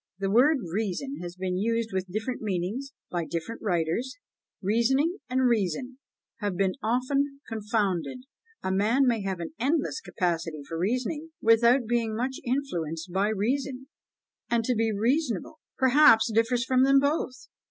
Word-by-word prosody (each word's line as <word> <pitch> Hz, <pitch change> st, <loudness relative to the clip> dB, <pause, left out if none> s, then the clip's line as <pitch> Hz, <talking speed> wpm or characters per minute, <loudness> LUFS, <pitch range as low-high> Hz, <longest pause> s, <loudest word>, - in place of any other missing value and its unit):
The 195 Hz, 0 st, -1 dB
word 275 Hz, +8 st, +5 dB, 0.2 s
reason 225 Hz, +7 st, -2 dB
has 175 Hz, 0 st, -7 dB
been 185 Hz, 0 st, -2 dB
used 230 Hz, +2 st, 0 dB
with 190 Hz, 0 st, -2 dB
different 220 Hz, +5 st, -3 dB
meanings 210 Hz, +7 st, -3 dB, 0.2 s
by 175 Hz, -1 st, -1 dB
different 170 Hz, +8 st, -5 dB
writers; 200 Hz, +7 st, -1 dB, 0.4 s
reasoning 265 Hz, -, +1 dB
and 255 Hz, 0 st, +2 dB
reason 235 Hz, -, -1 dB, 0.4 s
have 205 Hz, -4 st, -2 dB
been 190 Hz, -1 st, +2 dB
often 275 Hz, +5 st, 0 dB
confounded; 205 Hz, -, -1 dB, 0.4 s
a 190 Hz, -, -1 dB
man 220 Hz, +8 st, +3 dB
may 235 Hz, -4 st, +2 dB
have 190 Hz, -2 st, -3 dB
an 165 Hz, -1 st, -6 dB
endless 295 Hz, -, 0 dB
capacity 165 Hz, -, -2 dB
for 165 Hz, -1 st, -4 dB
reasoning, 255 Hz, -, -1 dB
without 235 Hz, +3 st, +4 dB
being 230 Hz, -1 st, 0 dB
much 255 Hz, +3 st, -2 dB
influenced 175 Hz, -, -3 dB
by 195 Hz, +3 st, +1 dB
reason, 255 Hz, +5 st, -2 dB, 0.6 s
and 235 Hz, -1 st, +2 dB
to 250 Hz, -, +1 dB
be 225 Hz, -1 st, +1 dB
reasonable, 240 Hz, -, -1 dB, 0.2 s
perhaps 260 Hz, -4 st, +6 dB
differs 230 Hz, +2 st, +2 dB
from 255 Hz, -1 st, +3 dB, 0.2 s
both! 280 Hz, -2 st, -1 dB
225 Hz, 140 wpm, -27 LUFS, 190-260 Hz, 0.6 s, perhaps